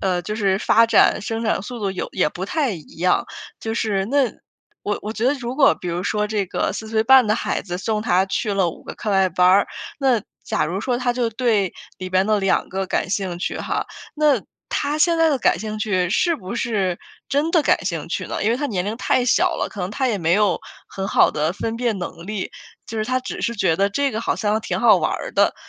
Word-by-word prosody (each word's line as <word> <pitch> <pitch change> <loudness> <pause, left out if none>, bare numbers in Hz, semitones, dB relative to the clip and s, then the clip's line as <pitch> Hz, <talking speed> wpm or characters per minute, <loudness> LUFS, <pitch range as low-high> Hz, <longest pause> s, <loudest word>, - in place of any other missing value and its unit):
呃， 185 -2 0
就 210 +5 -5
是 195 -3 +1
发 230 +2 +4
展 - - +4
生 225 +1 -3
长 215 -3 0
速 245 +2 -7
度 200 -2 -1
有 190 - -4
也 - - +2
不 180 +4 -6
太 280 +5 0
一 160 -5 -11
样。 180 +2 +2 0.3
就 225 - -4
是 205 -4 0
那 275 0 +2 0.5
我 205 - -2
我 215 - -4
觉 225 +1 -3
得 260 - +4
如 255 -1 -5
果 275 -2 +5
比 180 - -7
如 175 +1 -2
说 210 +1 0
这 210 -1 -1
个 - - -1
4 220 - -6
岁 220 0 +1
半 260 +1 +6
的 215 - +2
孩 - - -2
子 180 -1 -5
送 215 +1 -1
他 190 -4 +2
去 205 +2 -1
了 190 -3 +2
五 - - -9
个 - - -7
课 215 - -4
外 190 -1 +3
班 180 +1 +3
儿， 195 +2 +5 0.3
那 255 -6 +2 0.2
假 220 - 0
如 185 +5 -3
说 245 0 -1
他 250 -1 0
就 240 -2 -1
对 215 -5 +1 0.3
里 185 0 -6
边 185 +1 +2
的 215 -1 +2
两 195 -1 +1
个 190 0 -3
感 180 - -1
兴 190 -3 -2
趣 - - -3
哈。 - - -2 0.3
那 295 -7 +3 0.3
他 290 +2 0
现 335 +1 +3
在 325 -1 +5
的 280 - +1
感 225 - +2
兴 215 +2 -5
趣 185 -4 0
是 340 - +2
不 200 - -7
是 195 -7 -1 0.3
真 290 +4 +1
的 330 -3 +3
感 - - +2
兴 170 -4 -3
趣 - - -3
呢？ - - -3
因 215 - +2
为 235 - +2
他 290 +1 -2
年 185 -7 -2
龄 210 +3 -3
太 250 +1 +1
小 345 +7 +3
了， - - -2
可 200 - -8
能 180 - -3
他 260 +5 0
也 220 - 0
没 165 0 +1
有 205 -1 +3 0.3
很 195 0 -4
好 - - +4
的 155 +2 -1
分 225 +4 -3
辨 230 -4 -1
能 175 -1 -7
力， 210 -2 -4 0.4
就 225 - -6
是 215 - 0
他 255 +2 0
只 255 - -6
是 235 - 0
觉 190 -6 +1
得 200 +2 +2
这 280 +6 0
个 220 - -3
好 - - 0
像 210 -1 0
挺 - - -2
好 - - +6
玩 - - 0
儿 - - -4
的。 - - +3
215 Hz, 265 characters per minute, -21 LUFS, 190-245 Hz, 0.5 s, 半